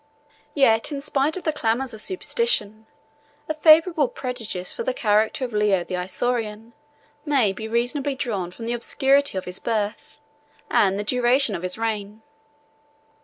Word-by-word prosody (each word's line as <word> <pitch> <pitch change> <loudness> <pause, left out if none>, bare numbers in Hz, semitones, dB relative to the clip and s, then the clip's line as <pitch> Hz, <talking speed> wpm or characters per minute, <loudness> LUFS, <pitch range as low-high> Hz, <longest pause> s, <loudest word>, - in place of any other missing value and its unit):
Yet 230 -2 +3
in 285 - -3
spite 280 +3 0
of 365 - -7
the 315 - 0
clamors 250 -1 -1
of 220 - -4
superstition, 220 - -1 0.6
a 310 - -1
favorable 315 0 +5
prejudice 230 -9 -5
for - - -6
the 255 - -2
character 215 +4 +1
of 240 - -8
Leo 210 -4 +2
the 185 - -8
Isaurian 220 +4 -2 0.5
may 270 -10 +2
be 220 +3 -6
reasonably 250 +5 -1
drawn 210 -10 -3
from 225 +6 -9
the 235 - -1
obscurity 275 +1 +1
of 185 - -4
his 180 +1 -5
birth, 215 +2 -3 0.5
and 195 -1 +3
the 205 - -2
duration 250 +1 +2
of 170 - -4
his 185 +2 +1
reign. 215 -1 -4
230 Hz, 155 wpm, -23 LUFS, 210-275 Hz, 0.6 s, favorable